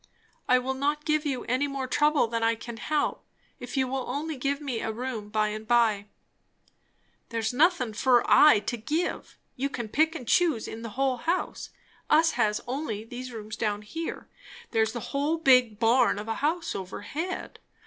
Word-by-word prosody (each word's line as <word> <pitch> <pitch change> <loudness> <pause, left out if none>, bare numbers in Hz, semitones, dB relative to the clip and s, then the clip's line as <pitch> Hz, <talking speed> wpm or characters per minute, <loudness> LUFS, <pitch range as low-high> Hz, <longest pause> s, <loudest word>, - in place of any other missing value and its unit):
"I 250 - +6
will 255 +1 -1
not 290 +3 -1
give 305 -1 +1
you 260 -3 -2
any 255 +4 0
more 275 -1 -3
trouble 295 +2 +3
than 230 0 -2
I 230 0 +2
can 230 0 -8
help 300 +5 -1 0.4
if 245 +3 -7
you 260 -1 +2
will 265 0 -3
only 310 +2 -3
give 275 +2 -1
me 270 -6 -3
a 220 - -2
room 225 -2 -5
by 215 0 +1
and 215 +1 -6
by." 225 -4 +3 1.2
"There's 225 -1 -2
nothin' 290 -5 +2
fur 245 +2 +3
I 295 -9 +7
to 240 - -3
give 305 +10 -3 0.2
you 275 +2 -1
can 240 -4 -5
pick 315 +6 +2
and 250 -7 -7
choose 320 -9 +2
in 225 - -7
the 230 - -6
whole 265 -2 +1
house. 335 +9 -2 0.4
Us 320 +2 +5
has 210 0 +1
only 245 -5 -3
these 250 +2 -8
rooms 215 -2 -7
down 210 -2 -2
here; 325 +10 -6 0.4
there's 220 0 +1
the 240 - -4
whole 290 +4 +1
big 250 -8 +4
barn 230 +1 +3
of 210 +1 -6
a 225 - -1
house 325 +3 0
overhead. 205 - -5
250 Hz, 180 wpm, -27 LUFS, 225-295 Hz, 1.2 s, I